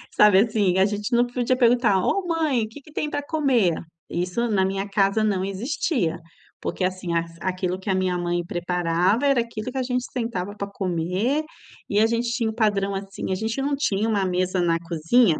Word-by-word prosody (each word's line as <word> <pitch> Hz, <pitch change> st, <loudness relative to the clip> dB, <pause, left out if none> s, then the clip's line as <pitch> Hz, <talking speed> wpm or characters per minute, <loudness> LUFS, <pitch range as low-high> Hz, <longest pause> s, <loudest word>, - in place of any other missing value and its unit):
Sabe, 210 Hz, -2 st, +7 dB
assim, 205 Hz, -4 st, +2 dB
a 190 Hz, -, +6 dB
gente 205 Hz, +3 st, -3 dB
não 240 Hz, +1 st, +3 dB
podia 245 Hz, +1 st, 0 dB
perguntar: 235 Hz, -5 st, +4 dB
"Ô 395 Hz, -2 st, +1 dB
mãe, 305 Hz, -9 st, +1 dB
que 250 Hz, +6 st, -12 dB
que 305 Hz, -, -17 dB
tem 300 Hz, 0 st, -2 dB
para 290 Hz, -, -1 dB
comer?" 270 Hz, -, +2 dB, 0.4 s
Isso 180 Hz, +7 st, -1 dB
na 190 Hz, -3 st, +2 dB
minha 195 Hz, +1 st, -2 dB
casa 195 Hz, +2 st, +2 dB
não 195 Hz, -3 st, +1 dB
existia. 195 Hz, -, -1 dB, 0.4 s
Porque, -, -, -3 dB
assim, 185 Hz, -1 st, -2 dB, 0.3 s
aquilo 185 Hz, 0 st, -2 dB
que 190 Hz, -, -15 dB
a -, -, +3 dB
minha 185 Hz, -1 st, 0 dB
mãe 175 Hz, 0 st, -1 dB
preparava 175 Hz, +7 st, +1 dB
era 275 Hz, -4 st, +4 dB
aquilo 230 Hz, +1 st, -5 dB
que 265 Hz, -, -6 dB
a 260 Hz, -, +1 dB
gente 250 Hz, 0 st, -1 dB
sentava 205 Hz, -5 st, -3 dB
para 200 Hz, -, -3 dB
comer 190 Hz, -, -1 dB, 0.4 s
e 205 Hz, -, +1 dB
a 220 Hz, -, +5 dB
gente 235 Hz, +1 st, 0 dB
tinha 235 Hz, -3 st, 0 dB
um -, -, -4 dB
padrão, 200 Hz, -3 st, +1 dB
assim, 195 Hz, 0 st, -5 dB
a -, -, +1 dB
gente 225 Hz, +6 st, -2 dB
não 285 Hz, +1 st, 0 dB
tinha 220 Hz, -6 st, 0 dB
uma 200 Hz, -3 st, +1 dB
mesa 185 Hz, 0 st, 0 dB
na 165 Hz, -1 st, +2 dB
cozinha 170 Hz, +3 st, +2 dB
205 Hz, 200 wpm, -24 LUFS, 185-240 Hz, 0.4 s, Sabe